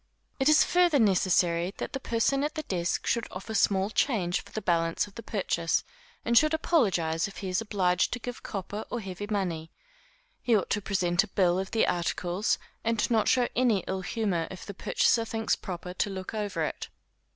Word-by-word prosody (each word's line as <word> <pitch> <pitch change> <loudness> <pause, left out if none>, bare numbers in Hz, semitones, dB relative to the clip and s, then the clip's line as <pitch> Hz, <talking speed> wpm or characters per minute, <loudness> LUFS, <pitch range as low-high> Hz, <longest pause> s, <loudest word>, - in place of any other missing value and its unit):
It 270 +2 +4
is 305 0 +7
further 350 -4 +3
necessary 180 -4 +2
that - - -5
the 270 - -2
person 265 +3 +1
at 300 +2 -2
the 310 - -3
desk 175 - -2
should 235 0 0
offer 195 +4 -7
small 200 -1 +2
change 195 -9 +1
for - - -17
the - - -3
balance 165 -4 +1
of 205 - -15
the 230 - -8
purchase, 170 -6 0 0.4
and 235 - +1
should 310 +5 +5
apologise 185 - +1
if 200 - -12
he 190 - -4
is 185 +3 0
obliged 190 -5 +1
to - - -1
give 245 +1 -6
copper 205 +1 -5
or 240 - -3
heavy 195 -1 -6
money; 175 -6 -2 0.7
he 235 -3 +3
ought 190 - -3
to 205 - +1
present 185 -2 +1
a - - -8
bill 185 -2 +2
of 190 +1 -3
the 225 - +2
articles, 175 +2 0 0.3
and 230 +1 0
not 220 -2 +3
show 250 -2 +3
any 230 -6 +2
ill 190 0 -3
humor 185 -5 -1
if 185 - -9
the 200 - -7
purchaser 230 +4 +2
thinks 225 0 -1
proper 180 -1 -7
to 195 - -1
look 190 0 -6
over 210 -2 -2
it. - - -4
200 Hz, 195 wpm, -28 LUFS, 180-230 Hz, 0.7 s, is